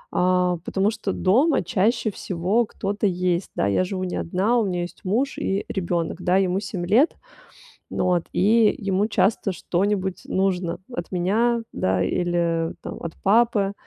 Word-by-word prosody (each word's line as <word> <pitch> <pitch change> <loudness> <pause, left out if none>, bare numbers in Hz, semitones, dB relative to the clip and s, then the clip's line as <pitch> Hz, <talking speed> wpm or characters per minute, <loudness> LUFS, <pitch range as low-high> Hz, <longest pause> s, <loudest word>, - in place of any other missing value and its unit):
э, 180 -1 +2
потому 195 +2 +1
что 210 -3 -3
дома 250 - +2
чаще 205 +5 +1
всего 190 +6 0
кто-то 205 +1 -2
есть, 180 -1 -1
да, 100 - +1
я 100 - +2
живу 185 0 -3
не 180 - -4
одна, 195 +8 0
у 225 - +2
меня 180 -2 -1
есть 175 - -9
муж 240 +9 0
и 195 +1 -1
ребёнок, 175 -3 -2
да, 180 +1 +2
ему 190 0 +1
7 190 -3 -4
лет. 250 - +4 0.8
Вот. 180 -2 0
И 215 +3 +4
ему 200 -1 0
часто 200 -1 +1
что-нибудь 190 +1 -1
нужно 185 -3 0 0.2
от 175 -7 -5
меня, 220 +7 +1
да, 95 0 0
или 170 - 0
там - - -7
от 165 -1 -6
папы. 205 -1 +3
190 Hz, 155 wpm, -23 LUFS, 175-210 Hz, 0.8 s, лет